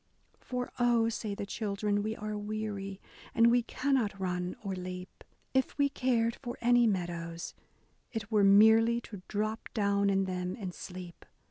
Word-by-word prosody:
For 250 -1 -4
oh," 235 -2 +4
say 215 -2 -3
the 200 - -4
children, 205 0 -1
we 220 +1 -2
are 215 -1 -4
weary. 205 -2 -4 0.4
And 230 +1 +6
we 245 0 +4
cannot 240 -4 0
run 180 -1 -2
or 195 -2 -2
leap; 180 0 -7 0.3
If 265 +1 +1
we 285 -1 +3
cared 240 -4 +1
for 240 -3 -6
any 240 0 +5
meadows, 170 -3 -3 0.6
it 225 -1 -5
were 210 -2 +4
merely 220 +4 +6
To 205 -5 -9
drop 215 +2 -2
down 200 -2 +2
in 195 0 +2
them 180 -1 -3
and 185 -4 -5
sleep. 180 -2 -9
210 Hz, 155 wpm, -31 LUFS, 195-230 Hz, 0.6 s, And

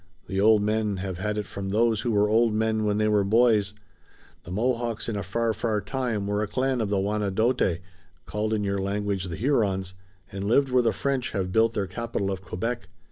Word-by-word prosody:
The 95 0 -1
old 110 0 +5
men 105 -1 0
have 95 -1 -4
had 105 +2 -2
it 105 - -2
from 100 -1 -6
those 110 +1 +2
who 120 - -2
were 105 -2 +3
old 115 +1 +3
men 110 0 +1
when 105 0 +1
they 110 0 +2
were 105 -1 +3
boys. 105 -1 +3 0.7
The 85 - -8
Mohawks 115 +2 -1
in 115 - -2
a 100 - -2
far, 115 +4 -1
far 110 -1 -1
time 110 -1 -2
were 105 +1 0
a 105 - -1
clan 130 +2 0
of 105 - -1
the 100 -1 +1
Wanedote, 105 -1 +1 0.5
called 105 +1 -2
in 110 -2 0
your 100 0 -1
language 100 -1 -1
the 85 -3 -5
Hurons, 100 - 0 0.4
and 95 0 -5
lived 135 +6 +3
where 125 0 +4
the 115 -2 +2
French 135 0 -2
have 95 -3 -2
built 115 +2 +3
their 100 -2 0
capital 100 0 -3
of 95 -1 -4
Quebec. 115 +6 -4
105 Hz, 210 wpm, -26 LUFS, 100-115 Hz, 0.7 s, old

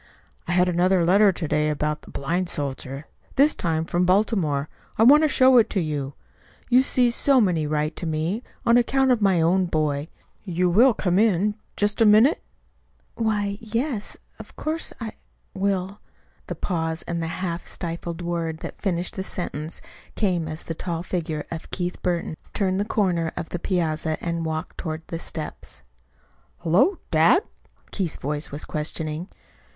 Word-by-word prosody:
"I 175 - 0
had 180 0 +4
another 180 0 +3
letter 200 +3 +5
to 175 -3 -4
day 150 +1 +1
about 150 0 -2
a - - -11
blind 175 +6 -2
soldier 135 -1 -3 0.3
this 290 +3 +5
time 160 -2 -1
from 175 +2 0
Baltimore. 180 -7 +2 0.3
I 220 - +4
want 285 +6 +8
to 310 - +3
show 260 -2 +6
it 225 - +3
to 195 - 0
you. 145 -4 -3 0.6
You 250 +2 +7
see, 250 -2 +3
so 270 +2 +4
many 175 -8 +2
write 150 +1 -1
to 170 - -3
me, 160 +8 -1 0.2
on 235 +1 +5
account 265 +2 +3
of 240 -3 +2
my 195 -4 +3
own 180 +3 +3
boy. 150 -2 -1 0.4
You 180 -2 0
will 235 +6 +5
come 180 -1 +1
in, 210 -1 +3 0.2
just 205 +2 0
a 225 - +7
minute?" 220 +9 +5 0.7
"Why, 205 -3 -1
yes, 230 0 -2 0.2
of - - -12
course 315 +1 -3
I 225 -2 -4 0.4
will." 195 0 -1 0.5
The - - -4
pause, 160 -3 -2
and 170 -1 -3
the 165 - -2
half 170 0 -4
stifled 170 0 -5
word 165 -2 -3
that - - -8
finished 180 0 -2
the 190 - -2
sentence 160 -4 -5 0.3
came 180 -6 0
as 155 +1 -6
the 165 - -4
tall 170 0 -3
figure 160 -4 -3
of 165 -1 -6
Keith 180 -1 -3
Burton 170 -3 -1 0.2
turned 190 -1 +1
the 205 - 0
corner 175 -7 0
of 160 - -4
the 175 - -4
piazza 160 -3 0
and 170 -1 -2
walked 160 0 -4
toward 160 -2 -4
the 165 - -4
steps. 155 - -7 0.8
"Hullo! 190 - +3
Dad?" 165 - +5 0.5
Keith's 180 -6 -2
voice 150 +2 -3
was 145 +2 -6
questioning. 155 +2 -3
175 Hz, 165 wpm, -24 LUFS, 160-205 Hz, 0.8 s, want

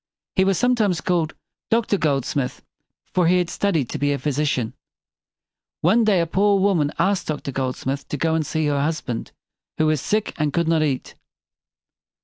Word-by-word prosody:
He 190 - +4
was 190 -1 +2
some 245 0 +3
times 205 -8 +1
called 165 -1 0 0.3
Doctor 225 -2 +2
Goldsmith; 140 -3 -1 0.5
for 180 -2 +3
he 180 +2 +4
had 175 -1 0
studied 170 -10 0
to - - -4
be 145 0 +1
a 140 - 0
phy 150 - -1
si 150 +3 0
cian. 125 -6 -1 1.1
One 220 +8 +4
day 205 -4 +4
a - - +1
poor 200 +4 +2
woman 185 -7 +2
asked 190 +2 +1
Doctor 150 -2 -3
Goldsmith 135 +1 -3
to 145 - -3
go 160 +3 +1
and 160 -1 +1
see 160 +1 -1
her 145 -1 +1
husband, 145 -6 -3 0.5
who 155 - +2
was 155 -2 +2
sick 215 0 -1
and 150 -1 +1
could 170 -1 +1
not 165 -1 +3
eat. 140 -4 -1
160 Hz, 185 wpm, -22 LUFS, 145-190 Hz, 1.1 s, He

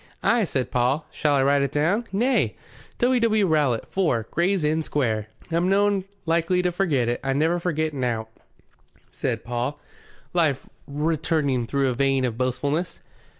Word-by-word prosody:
"Ay," 235 -2 +3
said 130 -6 -2
Paul. 130 +5 +1
"Shall 150 -2 +1
I 135 - +3
write 140 +1 +3
it 140 -1 0
down?" 180 +11 +1
"Nay. 240 +7 +1 0.4
'W. 250 +1 +3
W. 220 -3 +3
Rowlatt, 145 -9 +1
4, 130 - 0
Gray's 180 +1 +1
Inn 155 +2 +1
Square.' 115 -9 -1 0.2
I'm 170 +3 +1
noan 200 -1 +2 0.2
likely 170 +2 +1
to 180 - +1
forget 160 -10 +1
it. 120 - -1
I 135 0 0
never 160 +5 +1
forget 160 -3 -1
nowt," 120 -5 -2 0.8
said 115 -1 -3
Paul, 125 +4 -3 0.5
life 155 -6 +1 0.2
returning 145 -4 0
through 140 0 +1
a - - 0
vein 135 +1 +1
of 120 -3 -2
boastfulness. 140 +7 -2
150 Hz, 155 wpm, -24 LUFS, 130-175 Hz, 0.8 s, Ay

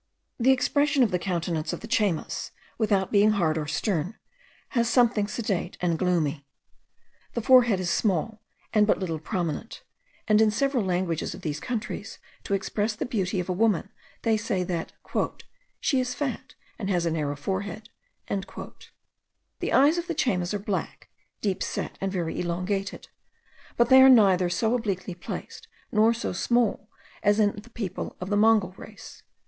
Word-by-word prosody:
The 245 +2 +3
expression 285 +1 +3
of 220 - +1
the 180 - +1
countenance 170 -3 -2
of - - -5
the 225 - -7
Chaymas, 210 -9 0 0.3
without 200 -4 +1
being 210 +1 +5
hard 165 -6 +1
or 155 -2 -2
stern, 170 +4 -1 0.5
has 235 -2 +1
something 235 -4 +3
sedate 205 -5 -3
and 170 -2 0
gloomy. 165 -6 0 0.9
The 235 - 0
forehead 240 -6 +6
is 180 -2 -1
small, 210 +2 0 0.3
and 210 -1 +4
but - - +3
little 165 -4 -3
prominent, 175 +6 -4 0.4
and 215 0 +5
in 220 - +5
several 250 +2 +1
languages 180 -3 -1
of 185 - -11
these 150 -2 -2
countries, 235 +3 -5 0.3
to 200 - +1
express 210 +3 -1
the - - -3
beauty 195 -6 -1
of 180 - -3
a 185 - 0
woman, 200 -1 +1 0.3
they 225 -1 +3
say 205 -4 -1
that 175 -2 -3 0.9
'she 270 - +1
is 250 0 -2
fat, 275 -6 -4 0.2
and 200 -3 -3
has 175 -3 +1
a 165 - +1
narrow 150 -3 -1
forehead.' 195 +7 -4 0.4
The 195 -1 -8
eyes 295 +6 +5
of 345 - -5
the 340 - -2
Chaymas 180 -11 0
are 205 - 0
black, 200 -1 -4 0.3
deep 195 -3 -1
set, - - -4
and 195 0 -1
very 175 -4 -2
elongated: 185 +3 -3 0.7
but 235 0 +3
they 260 0 +9
are 265 - +9
neither 190 -7 +5
so 220 +6 +1
obliquely 200 -6 -2
placed, 175 - -8 0.2
nor 220 +1 +4
so 235 -4 -3
small, 225 +1 +1 0.3
as 205 +1 +3
in 205 -1 +3
the 210 +3 -10
people 215 -6 -5
of 185 +2 -5
the - - +3
Mongol 215 -3 +4
race. 210 -2 -12
200 Hz, 165 wpm, -26 LUFS, 180-225 Hz, 0.9 s, they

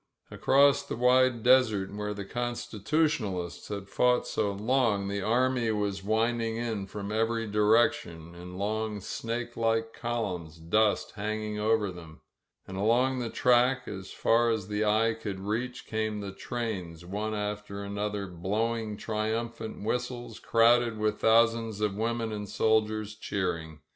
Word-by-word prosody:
Across 140 +1 +4
the - - -3
wide 125 -1 +3
desert, 115 -7 +4
where 105 0 -3
the 100 -1 -5
Constitutionalists 120 - -1
had 100 -2 -5
fought 125 +4 +2
so 100 - 0
long, 105 -1 +1
the 100 0 -2
army 120 +2 +2
was 100 -3 -1
winding 115 +2 0
in 110 -4 -3
from 100 0 -6
every 115 +1 0
direction, 105 -6 +2
in 90 +1 -9
long 105 +1 -2
snake 115 +4 -4
like 115 0 0
columns, 90 -9 -3
dust 105 +6 +1
hang 110 +1 -3
ing 105 0 -4
over 105 -2 +2
them. 80 -3 -12 0.5
And 95 - -6
along 125 +6 +2
the 120 -2 -2
track, 125 +1 +3
as 95 -2 -7
far 115 +1 +3
as 110 -4 -1
the 105 +1 0
eye 110 +2 +3
could 105 -3 -5
reach, 115 +5 -3
came 110 -1 -2
the 100 -1 -5
trains, 95 -7 -5
one 105 +4 -3
after 105 -1 -4
another, 100 0 -3
blowing 105 +5 -2
triumphant 110 +1 -3
whistles, 120 +2 -3
crowded 115 0 +4
with 105 0 0
thousands 115 -1 +3
of 105 -2 0
women 115 +1 -1
and 105 -1 -5
soldiers 110 -1 +1
cheering. 85 -7 -3
110 Hz, 145 wpm, -29 LUFS, 100-115 Hz, 0.5 s, Across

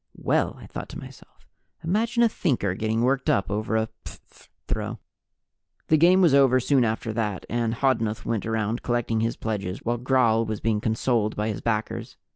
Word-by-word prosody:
Well, - - 0
I - - -11
thought - - -7
to - - -8
myself, - - -13 0.4
imagine 225 +7 +1
a - - +6
Thinker 125 - 0
getting 110 +3 -1
worked 135 +2 +1
up 100 0 +1
over 110 +2 -1
a 110 0 0 0.2
phph - - -14 0.2
throw! - - -3 0.9
The 155 - +5
game 180 +4 +5
was 170 -6 +5
over 135 -2 +5
soon 130 0 +3
after 110 0 -2
that, 105 -4 -2
and 115 -1 0
Hodnuth 115 -4 0
went 110 -2 -2
around 110 +1 -1
collecting 120 -2 0
his 115 +1 -1
pledges 100 -4 -4
while 120 0 -1
Gral 120 -3 +3
was 110 -2 -4
being 110 -1 0
consoled 110 -1 0
by 105 +1 -1
his 105 - -4
backers. 110 -2 -3
115 Hz, 180 wpm, -25 LUFS, 110-130 Hz, 0.9 s, a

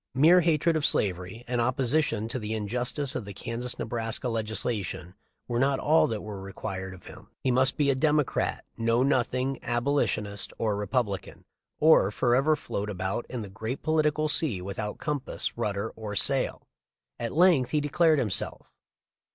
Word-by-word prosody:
Mere 165 +7 +6
hatred 165 0 +2
of 155 - 0
slavery 95 +2 0
and 120 0 0
opposition 125 -2 +1
to 125 - -4
the 110 0 -3
injustice 125 +6 -2
of - - -3
the 100 -1 -9
Kansas 120 +3 -3
Ne - - -3
braska 115 +2 -2
legislation 110 -5 -2 0.3
were 120 -1 -1
not 135 +1 +2
all 155 +4 +3
that 110 -2 -4
were 105 -2 -7
required 95 -1 -6
of 90 - -17
him. - - -12 0.2
He 130 - +2
must 130 +2 +3
be 145 -2 +3
a - - +2
Democrat, 150 +1 0
Know 115 +2 +2
Nothing, 130 0 0
Abolitionist, 120 -5 -1
or 110 -3 0
Republican, 105 0 -2 0.3
or 155 -11 +6
forever 130 +8 +2
float 105 -8 -4
about 95 +3 -3
in 125 -3 -4
the - - -7
great 110 +5 -5
political 155 -1 +1
sea 145 - +1
without 100 +3 -5
compass, 150 -3 -2
rudder, 105 -1 -2
or 105 -2 -6
sail. - - +1 0.6
At 115 -1 -3
length 165 -7 +4
he 150 - +1
declared 155 +2 +3
himself. 105 -7 0
120 Hz, 160 wpm, -27 LUFS, 105-140 Hz, 0.6 s, Mere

